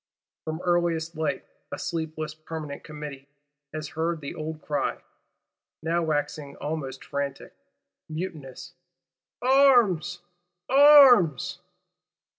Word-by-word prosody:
From 160 +2 -4
earliest 170 -2 0
light, 155 -1 -2 0.3
a - - -4
sleepless 155 -2 -4
Permanent 155 -2 -7
Committee 150 -3 -8 0.4
has 155 -1 -5
heard 165 +1 -2
the 140 -2 -6
old 155 -1 -6
cry, 145 0 -2 0.9
now 170 +2 +1
waxing 145 -2 -2
almost 140 -4 -5
frantic, 140 -1 -4 0.6
mutinous: 155 -5 -7 0.7
Arms! 240 - +4 0.4
Arms! 265 - +6
160 Hz, 90 wpm, -26 LUFS, 150-175 Hz, 0.9 s, Arms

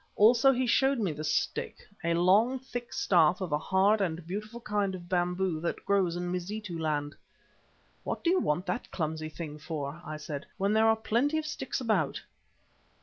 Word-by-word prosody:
Also 235 +5 +6
he 255 0 0
showed 270 +3 +3
me 200 -7 0
the 150 0 -6
stick, 155 0 -1 0.3
a 170 0 +1
long, 200 +9 +4
thick 245 -2 -7
staff 175 -2 +3
of 185 -5 -4
a 150 - +1
hard 195 +5 +3
and 165 -3 -2
beautiful 215 +6 -5
kind 205 -4 -1
of 175 -1 -10
bamboo 180 -1 0
which 170 +1 -1
grows 190 -4 +2
in 175 0 -3
Mazitu 185 +1 -4
land. 150 -2 -1 0.9
"What - - -4
do 340 - +3
you 370 - +3
want 160 +5 0
that 245 - -3
clumsy 155 -2 -3
thing 150 -2 -7
for," 150 0 -5
I 155 -3 -6
said, 150 -1 -6
"when 200 +1 +1
there 220 +1 +4
are 220 - +5
plenty 240 +7 +1
of 315 - -2
sticks 270 -4 -3
about?" 230 -4 0
185 Hz, 185 wpm, -29 LUFS, 165-220 Hz, 0.9 s, Also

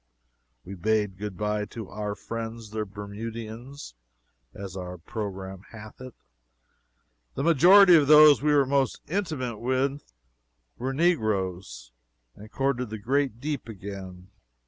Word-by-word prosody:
We 95 - -8
bade 105 0 -1
good 105 -3 -6
bye 105 0 -1
to 110 -1 -8
"our 105 0 -4
friends 115 -1 -7
the 110 0 -3
Bermudians," 110 - -8 0.6
as 95 +5 -8
our 90 -1 -6
programme 95 0 -6
hath 110 +1 -12
it 130 -2 -10 1.2
the 135 - -2
majority 175 +4 +7
of 150 -4 +4
those 150 -1 +8
we 150 +1 +2
were 145 -2 +4
most 135 -1 0
intimate 155 - -3
with 130 - -1 0.7
were 130 +2 -2
negroes 95 - -1 0.4
and 110 +2 -13
courted 135 -3 -1
the 110 - -5
great 130 +2 -1
deep 145 -3 -4
again. 95 -3 -9
110 Hz, 125 wpm, -26 LUFS, 100-135 Hz, 1.2 s, those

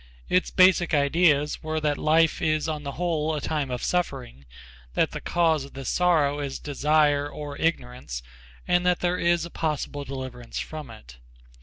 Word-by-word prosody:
Its 180 0 +2
basic 185 -3 +4
ideas 150 0 +2
were 155 0 -2
that 150 -1 0
life 160 +4 +2
is 155 -2 +1
on 155 -2 -3
the 140 -1 -6
whole 160 -2 -1
a - - -2
time 145 -2 -2
of 125 -1 -4
suffering, 130 - -2 0.5
that - - +2
the - - -6
cause 165 -4 +1
of 140 - -12
this 135 -1 -5
sorrow 155 -5 +2
is 140 -2 -4
desire 145 0 +1
or 145 -1 -7
ignorance, 125 - -2 0.4
and 175 0 +3
that 180 -1 +2
there 180 0 0
is 170 -1 +2
a 170 - -10
possible 150 -2 -3
deliverance 130 -3 -7
from 155 -4 -6
it. 110 - -13
150 Hz, 170 wpm, -25 LUFS, 140-165 Hz, 0.5 s, basic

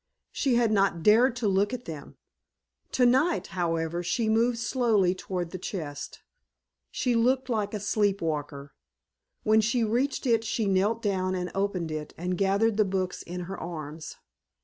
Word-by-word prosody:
She 265 -4 +1
had 235 -2 +3
not 195 -5 +2
dared 230 +5 +5
to 245 -4 -1
look 200 +4 +2
at 250 - -10
them! 155 -4 -9 0.7
Tonight, 260 +7 +3
however, 165 -1 -1
she 220 +6 0
moved 230 +2 +2
slowly 225 -7 +2
toward 180 -2 -4
the 185 - -6
chest. 150 -7 -6 0.7
She 250 - 0
looked 255 +3 +2
like 215 -3 -1
a - - -2
sleep 205 -1 +1
walker. 145 -3 -4 0.7
When 220 0 +4
she 230 +2 +1
reached 250 +6 0
it 230 -3 +3
she 225 0 -1
knelt 200 +4 +1
down 185 -2 0
and 180 -1 -3
opened 195 -4 -1
it 155 -1 -5
and 180 +2 -2
gathered 200 +3 +2
the 215 - +5
books 190 -2 -2
in 180 +1 -6
her 185 +2 -6
arms. 155 -2 -7
200 Hz, 160 wpm, -27 LUFS, 175-230 Hz, 0.7 s, dared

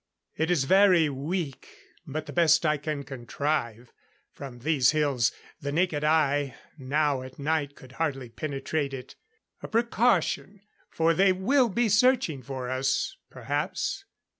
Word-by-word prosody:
It 160 +1 -1
is 170 -6 +2
very 185 0 +5
weak, 145 +1 -4 0.4
but 155 +2 -4
the - - -8
best 160 -2 +4
I 155 -1 +2
can 145 0 -4
contrive. 125 -2 -3 0.4
From 135 -3 -9
these 135 0 +2
hills 140 -8 +2 0.3
the 140 - -4
naked 160 -1 0
eye, 145 -3 +2 0.2
now 145 -1 0
at 130 0 -10
night 145 -1 -1
could 130 - -15
hardly 135 -4 -3
penetrate 140 +1 -3
it.... 130 0 -10 0.5
A - - -6
precaution, 225 -4 +1 0.3
for 165 0 +2
they 190 +3 +4
will 240 +7 +2
be 235 +4 +1
searching 215 - +3
for 130 0 -6
us 130 - 0
perhaps.... 395 0 -3
150 Hz, 140 wpm, -27 LUFS, 135-175 Hz, 0.5 s, very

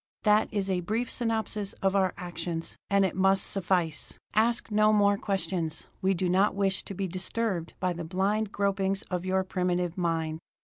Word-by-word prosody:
"That 210 0 +4
is 200 -3 -1
a 185 -2 +1
brief 220 +7 -2
synopsis 220 -3 -1
of 195 0 0
our 190 -2 +2
actions 175 -2 -4
and 200 -1 +4
it 185 - -2
must 195 +1 +3
suffice! 175 -5 -1 0.2
Ask 230 +1 +2
no 215 0 +4 0.3
questions; 180 -5 -2 0.2
we 190 0 +2
do 180 +1 0
not 190 +3 +3
wish 195 -1 +1
to 195 - -6
be 195 +1 -2
disturbed 185 0 -2
by 180 -1 0
the 170 0 -5
blind 195 +5 0
gropings 195 0 0
of 180 0 -2
your 190 0 +2
primitive 180 -1 -1
mind!" 160 -2 -1
190 Hz, 170 wpm, -28 LUFS, 180-205 Hz, 0.3 s, That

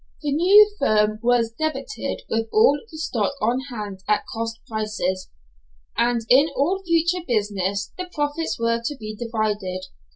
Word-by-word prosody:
The 290 - -1
new 380 +8 +7
firm 215 0 +2
was 235 -1 +2
debited 310 - -3
with 225 0 -1
all 430 -10 +5
the 315 - -9
stock 245 -7 -1
on 235 +4 +1
hand 210 -5 -6
at 210 -1 +2
cost 225 0 -4
prices, 215 -4 -2 0.7
and 235 0 +2
in 280 +6 +5
all 360 +8 +1
future 340 0 +1
business 200 -4 -1
the 365 0 -4
profits 295 +2 -2
were 230 0 +1
to 285 +4 -3
be 215 -1 -6
divided. 210 -5 -2
230 Hz, 150 wpm, -23 LUFS, 215-295 Hz, 0.7 s, new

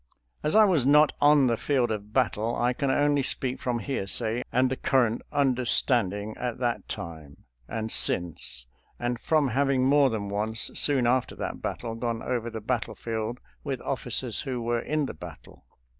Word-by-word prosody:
As 150 - 0
I 215 0 +8
was 175 -9 +3
not 150 +3 +5
on 145 -1 +6
the 120 -2 +2
field 130 -4 +1
of 105 -1 -5
battle 115 -2 0
I 120 +1 +1
can 140 +2 -1
only 145 +1 +2
speak 130 -1 -1
from 125 -2 -1
hearsay 115 0 -1
and 130 +1 +2
the - - 0
current 120 -4 +1
understand 125 -5 +2
ing 105 +1 -6
at 125 -2 -3
that 120 -2 -2
time 80 -4 -8 0.2
and 110 0 -4
since, 75 -8 -1 0.3
and 120 0 -2
from 155 -2 +2
having 135 +1 +2
more 140 0 +5
than 105 -4 -3
once, 110 +3 0
soon 135 -4 +2
after 125 +1 +1
that - - -5
battle, 115 -2 -4
gone 115 0 -3
over 120 -2 -2
the 110 -1 -6
battlefield 115 0 -3 0.2
with 135 -4 -3
officers 125 -2 -2
who 130 -4 -3
were 120 0 0
in 150 +3 -1
the - - -5
battle. 75 - -12
120 Hz, 175 wpm, -27 LUFS, 110-135 Hz, 0.3 s, I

